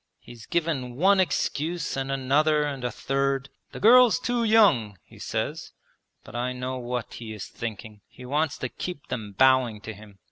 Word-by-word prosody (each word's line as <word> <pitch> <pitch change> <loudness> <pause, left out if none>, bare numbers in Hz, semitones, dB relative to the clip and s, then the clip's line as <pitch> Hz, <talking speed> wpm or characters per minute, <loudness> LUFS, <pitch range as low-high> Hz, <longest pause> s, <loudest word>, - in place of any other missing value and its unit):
He's 120 -2 -13
given 155 -8 -1
one 190 +7 +4
excuse, 170 -2 -1
and 135 0 -3
another, 150 +3 +2
and 140 -3 -4
a 125 - 0
third. 135 +3 -1 0.2
"The - - -8
girl's 245 +1 +7
too 245 -1 -1
young," 190 - +4
he - - -18
says. - - -4 0.5
But - - -12
I 125 +1 -2
know 125 +1 -4
what 120 -1 -4
he 110 -2 -7
is 105 -3 -7
thinking. 110 -2 -7
He 125 - -13
wants 150 +3 0
to 130 - -4
keep 175 0 -7
them 105 -4 -5
bowing 130 -2 +3
to 110 0 -7
him. 105 -1 -15
130 Hz, 175 wpm, -26 LUFS, 120-155 Hz, 0.5 s, girl's